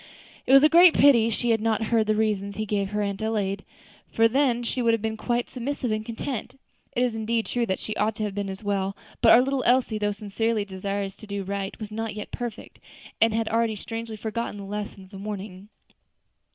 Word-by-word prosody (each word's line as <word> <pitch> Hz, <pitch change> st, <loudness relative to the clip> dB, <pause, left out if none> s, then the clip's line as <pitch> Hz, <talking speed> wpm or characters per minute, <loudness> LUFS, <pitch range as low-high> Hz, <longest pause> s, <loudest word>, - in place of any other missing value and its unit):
It -, -, +2 dB
was 275 Hz, +1 st, +8 dB
a -, -, +9 dB
great 340 Hz, +2 st, +7 dB
pity 235 Hz, -6 st, +6 dB
she 235 Hz, +1 st, 0 dB
had 225 Hz, -1 st, +2 dB
not 225 Hz, 0 st, +1 dB
heard 220 Hz, -2 st, +3 dB
the 215 Hz, -, +2 dB
reasons 205 Hz, -2 st, 0 dB
he 215 Hz, -, -2 dB
gave 200 Hz, -2 st, -1 dB
her 210 Hz, 0 st, -1 dB
Aunt 200 Hz, 0 st, -3 dB
Adelaide, 205 Hz, -3 st, -1 dB, 0.5 s
for 225 Hz, 0 st, +4 dB
then 245 Hz, -1 st, +1 dB
she 250 Hz, +2 st, -2 dB
would 230 Hz, -1 st, +4 dB
have 225 Hz, -, -6 dB
been 220 Hz, 0 st, -1 dB
quite 240 Hz, +2 st, -1 dB
submissive 255 Hz, -1 st, -3 dB
and 215 Hz, 0 st, -1 dB
content. 245 Hz, +3 st, -5 dB, 0.4 s
It 245 Hz, -, +2 dB
is 245 Hz, -2 st, +1 dB
indeed 225 Hz, +1 st, -1 dB
true 240 Hz, -1 st, -1 dB
that 190 Hz, -, 0 dB
she 215 Hz, -, -5 dB
ought 215 Hz, +1 st, +1 dB
to 215 Hz, -, -3 dB
have 205 Hz, -2 st, -2 dB
been 200 Hz, 0 st, -3 dB
as 190 Hz, +2 st, -7 dB
it -, -, -14 dB
was; 195 Hz, -1 st, -1 dB, 0.3 s
but 230 Hz, -, +7 dB
our 245 Hz, -, +8 dB
little 270 Hz, 0 st, 0 dB
Elsie, 245 Hz, -3 st, +2 dB
though 205 Hz, 0 st, +1 dB
sincerely 210 Hz, +1 st, -1 dB
desirous 195 Hz, 0 st, -4 dB
to 215 Hz, -, -12 dB
do 200 Hz, -1 st, -3 dB
right, 195 Hz, 0 st, -4 dB
was 215 Hz, -1 st, -7 dB
not 225 Hz, 0 st, -4 dB
yet 210 Hz, -, -7 dB
perfect, 240 Hz, -3 st, -6 dB, 0.4 s
and 225 Hz, -, +5 dB
had 225 Hz, 0 st, 0 dB
already 225 Hz, -1 st, +1 dB
strangely 225 Hz, +2 st, -6 dB
forgotten 220 Hz, 0 st, -4 dB
the 200 Hz, -, -7 dB
lesson 205 Hz, -1 st, -6 dB
of 190 Hz, -, -17 dB
the 195 Hz, -, -9 dB
morning. 200 Hz, -1 st, -7 dB
220 Hz, 230 wpm, -25 LUFS, 205-230 Hz, 0.5 s, a